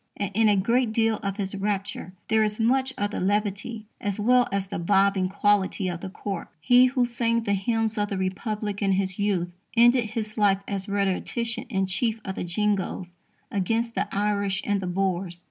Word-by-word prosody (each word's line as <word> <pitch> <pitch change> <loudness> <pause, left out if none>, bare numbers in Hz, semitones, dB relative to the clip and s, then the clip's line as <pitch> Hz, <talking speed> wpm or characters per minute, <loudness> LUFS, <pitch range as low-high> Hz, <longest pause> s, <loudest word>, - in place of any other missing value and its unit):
And, 200 -1 -2
in 220 +2 +4
a 205 - +4
great 230 +4 +1
deal 225 -1 +2
of 195 0 -4
his 195 -2 -2
rapture, 200 +1 -3
there 220 0 +3
is 210 0 0
much 260 +3 +2
of 205 0 -1
the - - -3
levity 205 +3 -1 0.2
as 205 0 -2
well 245 +3 +4
as 200 -1 -1
the 195 -3 -5
"bobbing" 195 +1 +2
quality 200 -1 +1
of 175 -1 -4
the 190 - -5
cork. 195 -1 -5
He 245 +10 +6
who 250 -1 +1
sang 230 -1 0
the 200 -2 0
hymns 225 +2 0
of 205 0 0
the 195 - -2
Republic 205 +2 -3
in 195 -1 +2
his 190 0 -1
youth, 195 -4 0 0.3
ended 240 +1 +6
his 215 0 -4
life 200 -1 +3
as 200 0 -3
rhetorician 225 +4 -1
in 195 -6 -1
chief 220 +4 -1
of 190 - -3
the - - -4
Jingoes 190 -1 -1 0.4
against 225 +4 0
the 210 - -1
Irish 200 -1 0
and 205 -1 0
the 185 - -3
Boers. 180 -1 -1
205 Hz, 195 wpm, -25 LUFS, 195-225 Hz, 0.4 s, He